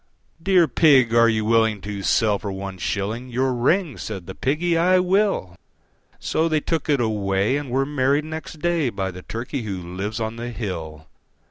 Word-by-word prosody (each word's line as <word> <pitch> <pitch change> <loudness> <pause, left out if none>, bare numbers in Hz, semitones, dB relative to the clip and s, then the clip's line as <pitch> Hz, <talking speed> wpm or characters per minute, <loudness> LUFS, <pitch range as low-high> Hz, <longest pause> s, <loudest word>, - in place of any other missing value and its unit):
III. 65 - -38
"Dear 180 -2 +4
Pig, 130 -4 +4
are 115 0 +6
you 110 -1 0
willing 110 -1 +3
to 100 0 -5
sell 105 +1 +2
for 100 - -5
one 95 -1 -6
shilling 110 +7 -3
Your 130 +2 0
ring?" 145 +5 +1
Said 95 -5 -6
the 95 - -7
Piggy, 165 - 0
"I 180 +3 +4
will." 185 - +1 0.6
So 165 +1 0
they 155 -1 +2
took 160 +1 -2
it 145 -2 +3
away, 105 0 0
and 145 -2 -3
were 135 +2 +1
married 145 +1 +1
next 160 0 -7
day 170 -5 +1
By 95 -4 -3
the 90 0 -10
Turkey 120 +7 -5
who 100 -4 -4
lives 95 +5 -5
on 110 0 -3
the 120 +1 -5
hill. 80 -9 -6
120 Hz, 190 wpm, -22 LUFS, 100-150 Hz, 0.6 s, are